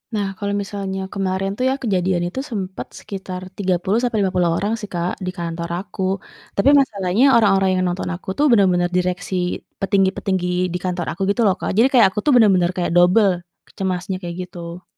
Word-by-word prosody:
Nah, 200 -2 0
kalau 200 -1 -3
misalnya 195 -1 -4
kemarin 195 -1 -1
tuh 255 - -1
ya - - +2
kejadian 185 -4 +1
itu 225 +9 -5
sempet 190 -3 -4
sekitar 190 -2 -7 0.2
30 190 +2 0
sampai 230 -3 0
50 180 -3 +1
orang 210 +3 -1
sih, 210 - -7
Kak, 175 +1 -1
di 185 - -2
kantor 170 0 -4
aku, 195 0 -8 0.5
tapi 200 +8 +4
masalahnya 200 -3 +1
orang-orang 195 -4 +4
yang - - +1
nonton 180 +1 -3
aku 185 - -10
tuh 295 - +3
bener-bener 180 -5 +3
direksi 180 +1 -2 0.4
petinggi-petinggi 190 -1 +1 0.3
di - - 0
kantor 180 -2 -2
aku 195 - -10
gitu 235 - -1
loh, 190 - +3
Kak, - - -2
jadi 240 +4 +6
kayak 230 -6 +7
aku 210 - -3
tuh 295 - +4
bener-bener 190 -6 +4
kayak 175 -2 -1
dobel 185 +4 +5 0.5
cemasnya, 185 0 -2
kayak 175 -2 -6
gitu. 175 0 -9
190 Hz, 180 wpm, -20 LUFS, 180-200 Hz, 0.5 s, kayak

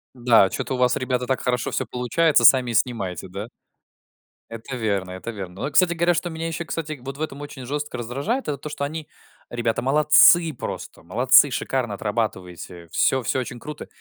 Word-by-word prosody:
Да, 120 -6 +4
что-то 130 - -3
у - - -4
вас, 125 0 +2
ребята, 125 -1 -1
так 130 +1 -1
хорошо 125 -1 -1
всё - - -1
получается, 145 +6 +2
сами 125 -2 +6
и - - -5
снимайте, 100 -7 -1
да? 100 +4 -6 1.0
Это 115 +3 -7
верно, 100 -6 -2
это 95 +5 -6
верно. 95 -4 -8
Но 100 - -9
вот, 140 - -3
кстати 180 -2 +4
говоря, 170 +1 +2
что 175 +1 -2
меня 165 0 -4
ещё, 165 +1 -4
кстати, 155 -3 -5
вот 135 +2 -7
в - - -9
этом 145 -2 -4
очень 145 -3 -8
жёстко 145 0 -4
раздражает, 140 - -3
это 145 - -2
то, 150 +3 -8
что 145 - -5
они, 155 +1 -5 0.4
ребята, 120 -1 -1
молодцы 150 +4 +5
просто, - - -7
молодцы, 125 - +5
шикарно 125 -3 -2
отрабатываете. 95 -5 -4
Всё, 130 - +2
всё 115 - -1
очень 125 -1 -6
круто. 150 +2 -8
125 Hz, 195 wpm, -23 LUFS, 115-150 Hz, 1.0 s, сами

